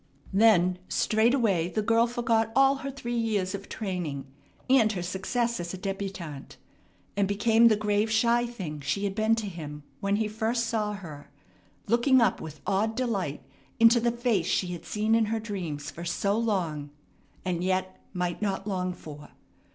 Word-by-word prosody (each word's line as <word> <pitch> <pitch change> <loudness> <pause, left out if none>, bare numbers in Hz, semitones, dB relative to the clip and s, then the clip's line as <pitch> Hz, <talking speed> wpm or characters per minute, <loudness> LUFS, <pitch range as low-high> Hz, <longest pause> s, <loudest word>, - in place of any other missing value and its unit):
Then 185 -4 +4
straightway 220 -6 +2
the 215 +3 -1
girl 230 +2 +3
forgot 230 -2 +1
all 270 +1 +5
her 275 0 -5
three 240 -3 -5
years 205 -5 0
of 200 0 -7
training, 175 -10 -4 0.4
and 250 -5 +5
her 180 -3 -3
success 210 +6 -1
as 175 +1 -4
a - - -7
débutante, 190 -6 -5 0.6
and 200 -1 +2
became 225 +3 +4
the 220 - +5
grave, 210 +1 +1
shy 235 +2 +3
thing 180 -11 -6
she 145 +8 -2
had 200 -1 -1
been 220 +2 +2
to 225 -2 -3
him 150 -6 -7 0.2
when 200 0 +1
he 215 +1 0
first 225 +2 -1
saw 215 -2 -1
her, 160 -8 -9 0.6
looking 240 +4 +4
up 230 - +2
with 155 -1 -9
awed 210 +3 +1
delight 200 - -2 0.4
into 230 +1 +7
the 235 +1 +1
face 235 -7 0
she 185 -1 +1
had 175 -2 -6
seen 215 +1 0
in 225 -1 +4
her 225 +1 -1
dreams 175 -9 -5
for 170 - -8
so 200 +4 0
long, 180 -10 -1 0.6
and 175 -1 -1
yet 185 0 -1
might 180 -1 -2
not 195 -2 -1
long 185 -3 -2
for. 150 -4 -11
205 Hz, 170 wpm, -27 LUFS, 180-230 Hz, 0.6 s, into